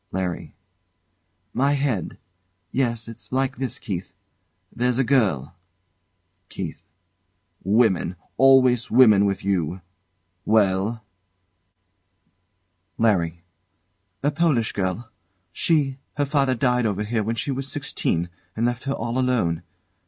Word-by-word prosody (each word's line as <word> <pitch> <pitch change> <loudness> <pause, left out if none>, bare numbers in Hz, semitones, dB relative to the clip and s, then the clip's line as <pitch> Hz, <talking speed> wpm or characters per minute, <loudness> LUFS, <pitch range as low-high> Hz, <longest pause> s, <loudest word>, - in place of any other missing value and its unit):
LARRY. 90 -2 -3 1.0
My 140 +3 +2
head! 135 - -1 0.5
Yes! 120 -3 0
It's 115 - -8
like 130 -1 0
this, 130 -1 -3
Keith 95 -2 -5 0.6
there's 125 0 +1
a 135 - +3
girl 105 - +1 1.0
KEITH. 85 -5 -6 0.8
Women! 100 -3 +2 0.2
Always 130 -3 +5
women, 110 -5 +6
with 100 -1 -1
you! 90 -2 -1 0.6
Well? 105 +1 +2 1.9
LARRY. 85 -7 +1 0.8
A 145 - +2
Polish 145 -8 +1
girl. 100 +4 -3 0.4
She 140 - +1 0.2
her 145 - +2
father 135 -2 +1
died 125 -1 +2
over 105 0 -1
here 110 +1 -1
when 115 +2 -2
she 115 +5 -2
was 135 +1 -3
sixteen, 85 +1 -1 0.3
and 115 - 0
left 120 +1 -2
her 135 - 0
all 120 0 -2
alone. 120 -11 +1
115 Hz, 110 wpm, -23 LUFS, 95-130 Hz, 1.9 s, women